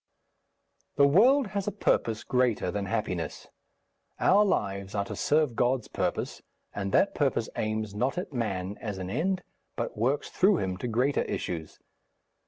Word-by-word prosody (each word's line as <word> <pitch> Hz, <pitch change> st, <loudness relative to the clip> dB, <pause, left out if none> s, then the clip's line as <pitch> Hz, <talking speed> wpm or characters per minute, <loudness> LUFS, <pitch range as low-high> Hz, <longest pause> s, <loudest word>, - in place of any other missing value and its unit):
The 140 Hz, -, +6 dB
world 240 Hz, -, +5 dB
has 200 Hz, -1 st, -3 dB
a -, -, +1 dB
purpose 115 Hz, -, 0 dB
greater 125 Hz, -7 st, +1 dB
than 100 Hz, 0 st, -3 dB
happiness; 95 Hz, -6 st, -3 dB, 0.7 s
our 205 Hz, +2 st, +5 dB
lives 100 Hz, -, -1 dB
are 100 Hz, -1 st, 0 dB
to -, -, -6 dB
serve 150 Hz, -5 st, +2 dB
God's 125 Hz, -1 st, +1 dB
purpose, -, -, -2 dB, 0.3 s
and 100 Hz, -1 st, -3 dB
that -, -, +3 dB
purpose -, -, 0 dB
aims 110 Hz, -1 st, -2 dB
not 125 Hz, +8 st, -1 dB
at 180 Hz, -4 st, -4 dB
man 100 Hz, -5 st, -2 dB
as 105 Hz, -4 st, -4 dB
an 95 Hz, 0 st, -5 dB
end, 185 Hz, -, 0 dB, 0.3 s
but -, -, -3 dB
works 130 Hz, +7 st, 0 dB
through 190 Hz, 0 st, +4 dB
him 95 Hz, -7 st, -2 dB
to 125 Hz, -, -4 dB
greater 125 Hz, +5 st, +1 dB
issues.... 80 Hz, -3 st, -4 dB
115 Hz, 155 wpm, -28 LUFS, 100-150 Hz, 0.7 s, The